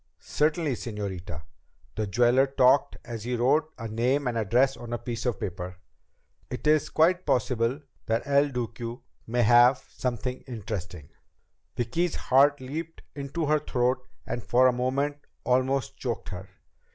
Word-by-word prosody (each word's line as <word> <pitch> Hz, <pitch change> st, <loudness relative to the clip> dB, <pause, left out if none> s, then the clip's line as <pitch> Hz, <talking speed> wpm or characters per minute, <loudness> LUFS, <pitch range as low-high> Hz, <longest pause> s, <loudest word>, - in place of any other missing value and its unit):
"Certainly, 155 Hz, -1 st, 0 dB
señorita." 95 Hz, -7 st, -5 dB, 0.5 s
The 110 Hz, -1 st, -2 dB
jeweler 120 Hz, +6 st, +4 dB
talked 135 Hz, 0 st, +3 dB
as 115 Hz, -3 st, -6 dB
he 125 Hz, +1 st, -2 dB
wrote 150 Hz, +6 st, +2 dB
a 115 Hz, -, -5 dB
name 125 Hz, +6 st, 0 dB
and 125 Hz, -2 st, -1 dB
address 120 Hz, +5 st, +2 dB
on 120 Hz, 0 st, -7 dB
a -, -, 0 dB
piece 120 Hz, +1 st, -4 dB
of 120 Hz, -5 st, -1 dB
paper. 90 Hz, -2 st, -5 dB, 0.7 s
"It 125 Hz, -, -6 dB
is 150 Hz, -1 st, +3 dB
quite 175 Hz, +3 st, +3 dB
possible 125 Hz, +2 st, 0 dB, 0.3 s
that 115 Hz, +1 st, 0 dB
El 140 Hz, +1 st, +3 dB
Duque 120 Hz, -2 st, -4 dB, 0.3 s
may 120 Hz, +1 st, +1 dB
have 120 Hz, +3 st, +6 dB, 0.2 s
something 125 Hz, +1 st, -3 dB
interesting 95 Hz, -, -6 dB, 0.3 s
..." -, -, -44 dB
Vicki's 145 Hz, +9 st, 0 dB
heart 140 Hz, +2 st, +4 dB
leaped 160 Hz, +6 st, -6 dB
into 145 Hz, +3 st, -3 dB
her 150 Hz, +1 st, +3 dB
throat 125 Hz, -2 st, 0 dB, 0.2 s
and 120 Hz, -, -3 dB
for 120 Hz, +6 st, +4 dB
a 130 Hz, -, +5 dB
moment 135 Hz, +4 st, -1 dB, 0.3 s
almost 130 Hz, 0 st, +1 dB
choked -, -, -4 dB
her. -, -, -7 dB
125 Hz, 150 wpm, -27 LUFS, 115-140 Hz, 0.7 s, have